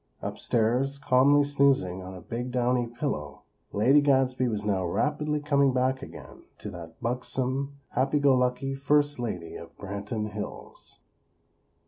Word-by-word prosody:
Upstairs, 125 +5 0
calmly 140 +1 +4
snoozing 135 -10 +2
on 95 0 -8
a 90 - -9
big 120 +7 -4
downy 125 0 +1
pillow, 115 - -4 0.3
Lady 130 +8 +4
Gadsby 130 -2 +2
was 105 -3 -2
now 95 -3 +1
rapidly 150 - 0
coming 140 -2 +2
back 130 +1 +1
again - - -11 0.2
to - - -7
that 85 -2 -10
buxom, 130 +3 -2
happy 135 +3 +1
go 145 -2 +4
lucky 125 +2 0
First 145 +1 +1
Lady 90 -9 -4
of 85 - -11
Branton 105 +2 -4
Hills. 105 -1 -8
125 Hz, 135 wpm, -27 LUFS, 105-140 Hz, 0.3 s, calmly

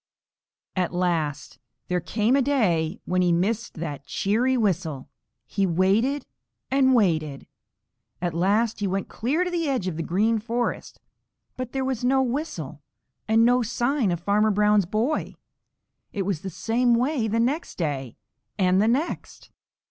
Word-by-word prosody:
At 180 -1 -1
last 155 -7 -1 0.3
there 180 0 0
came 210 +8 +1
a 280 - +4
day 195 - +1
when 185 0 +1
he 175 -1 +3
missed 210 +7 0
that 150 -4 -6
cheery 245 +6 +1
whistle. 170 - -1 0.4
He 195 -1 0
waited 200 - +2 0.5
and 265 -1 +4
waited. 155 - +1 0.7
At 175 -1 -2
last 205 +7 +1
he 205 - 0
went 195 +1 -2
clear 285 +10 0
to 360 - -3
the 335 -4 -1
edge 250 -9 -1
of 165 -4 -3
the - - -2
Green 215 +7 +1
Forest, 235 +2 -3 0.6
but 255 -1 -5
there 265 -1 -2
was 260 -2 -2
no 265 +1 +3
whistle 235 - -4 0.5
and 225 +1 +4
no 245 +1 +4
sign 240 +1 0
of 175 -2 -1
Farmer 205 +4 +2
Brown's 210 -2 +3
boy. 225 - -1 0.8
It 200 - -2
was 185 -4 -2
the 190 - -5
same 230 +7 +1
way 250 -1 +1
the 225 +2 0
next 275 +8 -1
day 135 - -3 0.4
and 185 -1 +3
the 215 - +3
next. 275 +9 -2
210 Hz, 155 wpm, -25 LUFS, 175-245 Hz, 0.8 s, a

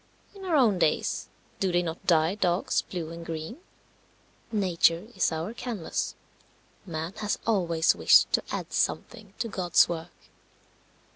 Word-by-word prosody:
In 390 -1 -10
our 345 -4 +1
own 225 -10 +4
days 155 - 0 0.3
do 190 -2 +1
they 175 0 +2
not 165 -1 -6
dye 160 0 +4
dogs 185 -3 +1
blue 165 -3 -6
and 170 0 -8
green? 165 - -6 0.9
Nature 180 -4 +2
is 190 - +2
our 165 +7 -3
canvas. 235 -8 -4 0.7
Man 160 +1 -4
has 210 -1 -1
always 170 -7 +2
wished - - +5
to - - +4
add - - -5
something 210 -4 -2
to 230 - -2
God's 180 -5 +3
work. 165 -1 -8
175 Hz, 140 wpm, -27 LUFS, 165-210 Hz, 0.9 s, wished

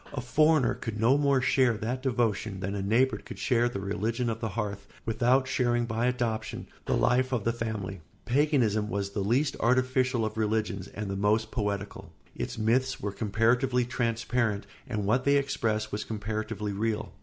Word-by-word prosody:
A 145 - -3
foreigner 150 +3 +3
could 110 -1 -5
no 115 +5 +4
more 140 -2 +3
share 125 -3 +3
that 120 +4 -3
devotion 115 -6 0
than 95 +1 -3
a 100 - -2
neighbour 115 +7 +2
could - - -10
share 120 -1 +2
the 100 - -5
religion 110 +5 -1
of 115 - -4
the 115 - -2
hearth 100 -1 -4 0.2
without 125 +4 +2
sharing 120 -2 +1
by 115 +1 0
adoption 115 -3 -2 0.2
the - - +2
life 130 +2 +2
of 120 -5 0
the 115 - +1
family. 105 -5 -4 0.2
Paganism 120 -6 +2
was 100 0 -2
the 100 - -3
least 125 +9 +1
artificial 130 -1 +2
of 110 0 -4
religions 110 -3 -1
and 105 0 -6
the 95 - -3
most 105 +2 +1
poetical; 100 -3 -3 0.2
its - - -4
myths 130 +5 +1
were 100 - -3
comparatively 120 +5 +1
transparent 115 -3 -1 0.2
and 105 -4 -2
what 125 +5 +2
they 140 +1 +4
expressed 115 -6 -1
was 105 +1 -2
comparatively 105 -1 -3
real. 110 +1 -2
115 Hz, 175 wpm, -28 LUFS, 105-125 Hz, 0.2 s, no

